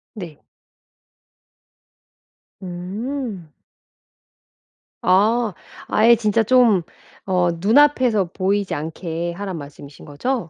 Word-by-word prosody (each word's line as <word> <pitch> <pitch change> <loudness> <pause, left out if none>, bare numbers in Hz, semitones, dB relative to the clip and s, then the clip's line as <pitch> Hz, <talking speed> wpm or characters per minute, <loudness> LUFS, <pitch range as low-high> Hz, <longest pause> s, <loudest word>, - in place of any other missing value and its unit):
네. 170 -8 -9 2.2
음. 190 - -6 1.5
아. 215 +4 +3 0.3
아예 230 +2 +5
진짜 220 0 +1
좀 230 -5 +4 0.4
어 180 -2 +1
눈앞에서 235 - +3
보이지 200 +1 -1
않게 165 +2 -4
하라는 190 0 -6
말씀이신 145 -1 -12
거죠? 175 - -3
195 Hz, 155 characters per minute, -20 LUFS, 175-230 Hz, 2.2 s, 아예